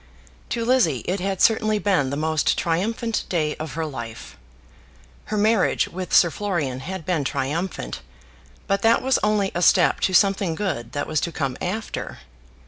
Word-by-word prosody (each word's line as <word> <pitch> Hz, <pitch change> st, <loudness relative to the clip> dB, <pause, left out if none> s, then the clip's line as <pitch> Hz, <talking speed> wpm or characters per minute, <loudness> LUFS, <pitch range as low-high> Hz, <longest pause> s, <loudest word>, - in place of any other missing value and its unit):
To 230 Hz, -1 st, -2 dB
Lizzie 225 Hz, -, +2 dB
it 190 Hz, +2 st, -1 dB
had 190 Hz, 0 st, -1 dB
certainly 215 Hz, -1 st, +3 dB
been 190 Hz, -10 st, +1 dB
the 140 Hz, -, -3 dB
most 155 Hz, 0 st, +1 dB
triumphant 220 Hz, +7 st, -1 dB
day 155 Hz, -4 st, 0 dB
of 155 Hz, -2 st, -6 dB
her 160 Hz, 0 st, -2 dB
life. 115 Hz, -6 st, -7 dB, 0.9 s
Her 215 Hz, -, -3 dB
marriage 215 Hz, -2 st, +2 dB
with 185 Hz, 0 st, -6 dB
Sir 175 Hz, -, +5 dB
Florian 155 Hz, -12 st, -2 dB
had 180 Hz, +4 st, -6 dB
been 175 Hz, -5 st, 0 dB
triumphant, 140 Hz, -, -3 dB, 0.6 s
but 195 Hz, 0 st, 0 dB
that 225 Hz, +3 st, +3 dB
was 265 Hz, 0 st, +2 dB
only 210 Hz, -2 st, +1 dB
a 175 Hz, -, -2 dB
step 180 Hz, 0 st, +4 dB
to 190 Hz, -, 0 dB
something 195 Hz, -4 st, +3 dB
good 125 Hz, -, -3 dB
that 145 Hz, -, -2 dB
was 155 Hz, -1 st, -1 dB
to 170 Hz, -, -2 dB
come 135 Hz, -5 st, -2 dB
after. 210 Hz, +5 st, -4 dB
180 Hz, 165 wpm, -23 LUFS, 155-205 Hz, 0.9 s, Sir